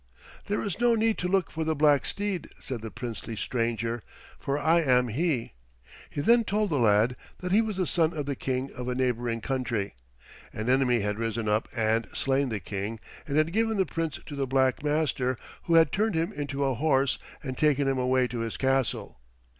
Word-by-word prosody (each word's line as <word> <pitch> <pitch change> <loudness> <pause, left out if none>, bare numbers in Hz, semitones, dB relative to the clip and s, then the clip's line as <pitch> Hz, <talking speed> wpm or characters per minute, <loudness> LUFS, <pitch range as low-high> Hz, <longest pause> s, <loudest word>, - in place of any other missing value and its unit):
"There 205 - -1
is 200 -1 -3
no 240 -1 +4
need 225 0 +1
to 180 - -1
look 190 -1 +1
for 160 - -2
the 160 0 0
black 145 -1 +4
steed," 200 -4 -2
said 125 -4 -5
the 110 - -5
princely 115 -1 -6
stranger, 115 +1 -1 0.4
"for 140 +1 -1
I 165 +3 +3
am 125 -4 +3
he." 135 0 -1 0.6
He 145 - -3
then 235 +9 +5
told 210 -2 0
the 145 - +1
lad 110 +2 +4 0.2
that 180 0 -4
he 210 +4 +5
was 215 -4 -3
the 185 - +1
son 165 -1 +2
of 150 -4 -4
the 140 0 -2
King 130 +1 -2
of 125 0 -6
a 125 - -1
neighboring 120 -2 0
country. 120 -6 -2 0.6
An 110 +3 -1
enemy 125 -3 +3
had 105 +1 -2
risen 115 -1 -2
up 105 +1 +1
and 115 0 +1
slain 135 0 +1
the 110 -3 -2
King 100 +3 -4 0.3
and 145 0 -1
had 155 +2 +2
given 225 0 +1
the 190 - +3
Prince 165 -4 -3
to 145 - -7
the 135 -1 -1
black 130 +2 +2
master 145 -4 0 0.3
who 170 - +3
had 165 -3 +6
turned 215 -1 +1
him 165 +1 0
into 140 -1 -3
a 135 - +1
horse 135 0 +2 0.2
and 130 -3 -4
taken 145 -1 +2
him 135 -1 +1
away 125 0 +2
to 120 -1 -5
his 115 -1 -3
castle. 130 - 0
135 Hz, 205 wpm, -28 LUFS, 120-160 Hz, 0.6 s, had